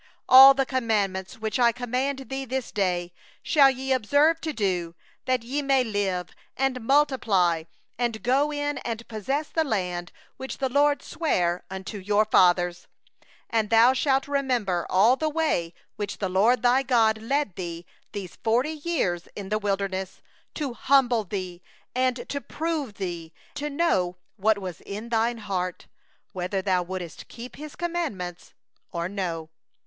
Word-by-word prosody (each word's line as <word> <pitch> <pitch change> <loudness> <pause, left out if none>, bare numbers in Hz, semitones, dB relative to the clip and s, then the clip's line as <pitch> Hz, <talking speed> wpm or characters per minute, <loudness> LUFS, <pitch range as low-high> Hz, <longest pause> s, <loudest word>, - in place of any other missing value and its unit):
All 270 +1 +10
the 270 0 +1
commandment 210 -7 -1
which 220 +2 -3
I 240 -1 +5
command 255 +3 -2
thee 270 0 -3
this 260 -1 -4
day 180 -3 -1 0.3
shall 280 -4 +6
ye 265 0 -1
observe 285 +7 +3
to 320 - -2
do, 180 - -1 0.3
that 255 -2 +1
ye 270 +5 -2
may 275 -2 +3
live, 195 -5 -2 0.3
and 265 -1 0
multiply, 225 - +2 0.3
and 230 -4 -1
go 275 +5 +2
in 290 -1 -2
and 230 0 -5
possess 270 +8 -2
the 325 - +1
land 180 - -2 0.3
which 265 0 -6
the 265 -1 -1
LORD 285 +2 +2
swore 180 - -1
unto 190 +2 -6
your 205 +3 +2
fathers. 175 -3 +3 0.7
2And 220 -2 +1
thou 230 +3 +6
shalt 270 +1 +1
remember 250 -11 0
all 215 +7 +5
the 310 +1 0
way 300 - 0 0.3
which 205 -2 -4
the 195 - -2
LORD 215 +8 +3
thy 250 +2 +4
God 230 -4 +3
hath 220 - -12
led 275 -8 0
thee 170 -2 -6 0.3
these 195 -3 -7
forty 240 +7 +1
years 290 - -2
in 200 -2 -6
the 215 +1 0
wilderness, 195 -2 -3 0.3
that - - -6
He 300 - -1
might 270 +1 +3
afflict 220 -6 0
thee, 185 -3 -5 0.6
to 280 - -4
prove 310 -9 -3
thee, 170 -4 -5 0.2
to 295 +1 -3
know 280 - +1 0.2
what 215 +1 +3
was 185 -4 -7
in 210 +4 -7
thy 230 0 +2
heart, 185 -5 -4 0.5
whether 185 +1 -2
thou 185 -2 +2
wouldest 175 -2 -7
keep 245 +2 -10
His 300 0 -9
commandments, 290 - -4 0.4
or 170 0 -2
no. 170 -5 -4
225 Hz, 155 wpm, -26 LUFS, 185-270 Hz, 0.7 s, All